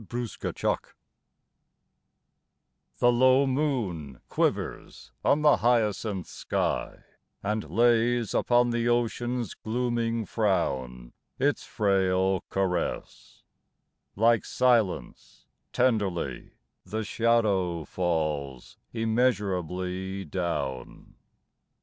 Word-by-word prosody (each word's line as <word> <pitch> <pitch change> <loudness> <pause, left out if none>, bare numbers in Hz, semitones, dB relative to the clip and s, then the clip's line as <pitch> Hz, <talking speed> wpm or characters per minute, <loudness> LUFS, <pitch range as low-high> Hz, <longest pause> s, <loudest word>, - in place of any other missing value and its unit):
126 120 -2 -4
XXXIII - - -1 2.0
THE 120 - +4
low 130 +3 +5
moon 115 - -2
quivers - - -2
on 150 +2 +3
the 150 - +6
hyacinth 110 -5 +1
sky, - - -3 0.4
And 105 -4 -2
lays 120 +3 +2
upon 120 0 +3
the 120 0 0
ocean's 120 -1 -1
glooming 115 -1 -1
frown 65 - -1 0.2
Its 145 +2 0
frail 95 -3 +1
caress; 95 -2 -3 0.7
like 115 +2 +3
silence 110 - 0 0.3
tenderly 100 - 0 0.3
The 110 +4 -4
shadow 105 -7 +1
falls 75 -7 -2
immeasurably 95 -5 -1
down. 75 -7 -4
105 Hz, 75 wpm, -27 LUFS, 90-120 Hz, 2.0 s, the